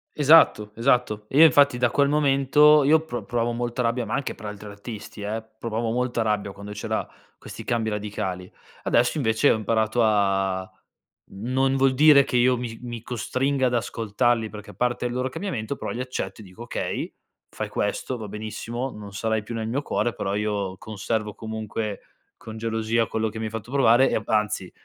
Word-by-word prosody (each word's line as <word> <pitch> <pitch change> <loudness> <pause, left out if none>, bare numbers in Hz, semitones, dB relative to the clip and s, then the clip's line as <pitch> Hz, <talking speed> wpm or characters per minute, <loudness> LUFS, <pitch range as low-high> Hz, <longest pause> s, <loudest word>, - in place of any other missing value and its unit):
Esatto, 145 -8 +5
esatto, 115 -3 +1
e 135 - -2
io 160 - +10
infatti 140 -3 +5
da 120 -1 +2
quel 140 -1 +3
momento 145 +1 +5
io 155 +3 +5
pro 120 -6 -5
provavo 120 0 -1
molta 120 +1 -2
rabbia, 120 +1 0
ma 110 - -2
anche 135 0 -2
per - - -12
altri 105 0 -8
artisti 105 +1 -9
eh? 110 +2 -3 0.2
Provavo 115 0 -2
molta 120 -1 0
rabbia 105 -2 -1
quando 100 +1 -9
c'era 105 0 -3 0.3
questi - - -9
cambi 115 -2 -1
radicali. 100 -3 -4 0.3
Adesso 120 +5 +2
invece 110 -6 +3
ho - - +3
imparato 110 +1 0
a 95 -3 +1 0.6
non 130 +6 0
vuol 135 0 +3
dire 145 0 +7
che 125 - -1
io 125 +1 +4
mi 115 -2 -6
mi 120 -2 -6
costringa 130 +3 0
ad 125 - -2
ascoltarli 115 0 0
perché, 105 0 -10
a - - -16
parte 125 0 -1
il 120 - -2
loro 125 +1 -1
cambiamento, 140 - -4
però - - -5
li 120 - -5
accetto 125 -3 -4
e - - -11
dico: 95 +4 -11
"Okay, 120 - -4 0.4
fai - - -5
questo, 105 +5 -2
va 110 -2 -7
benissimo, 110 +4 -5
non 105 -4 -10
sarai 110 +1 -1
più 110 - -7
nel 110 -1 -3
mio 130 +5 -1
cuore 120 - -1
però 95 - -2
io 105 -3 -2
conservo 105 -1 -3
comunque 110 -1 -5 0.4
con 110 0 -9
gelosia 115 0 0
quello 110 0 -1
che 110 - -9
mi 110 - -3
hai 110 - -4
fatto 115 +2 -7
provare 130 -2 +5
e, - - +1
anzi, 105 -4 0
115 Hz, 190 wpm, -24 LUFS, 105-125 Hz, 0.6 s, io